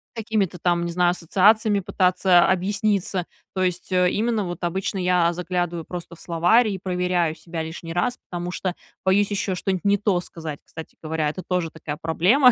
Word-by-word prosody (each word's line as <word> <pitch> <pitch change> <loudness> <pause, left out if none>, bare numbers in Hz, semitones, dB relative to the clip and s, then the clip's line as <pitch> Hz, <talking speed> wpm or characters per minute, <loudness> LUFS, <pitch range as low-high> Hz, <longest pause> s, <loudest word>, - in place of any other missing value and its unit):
какими-то 215 -5 -1
там, 175 -1 +1
не 170 - -3
знаю, 175 0 +3
ассоциациями 205 +4 +3
пытаться 185 -2 +3
объясниться. 195 -1 0 0.3
То 185 - 0
есть, 180 0 -2
э, 180 -1 +4
именно 220 +2 0
вот 175 0 -6
обычно 190 +3 -2
я 180 -2 +3
заглядываю 175 -1 -2
просто 175 -1 -7
в - - -20
словарь, 175 +8 +3
и 195 - -2
проверяю 180 -3 0
себя 165 +1 -6
лишний 165 +1 -7
раз, 245 +9 0
потому 175 0 -4
что 185 0 -2 0.3
боюсь 200 +2 +3
еще 195 -2 -1
что-нибудь 185 +1 -2
не 200 0 +4
то 200 -3 +1
сказать, 160 -4 -7
кстати 160 -1 -10
говоря, 155 -1 -1
это 170 +5 -5
тоже 180 -3 0
такая 150 -2 -6
проблема 200 - +5
180 Hz, 175 wpm, -23 LUFS, 170-195 Hz, 0.3 s, проблема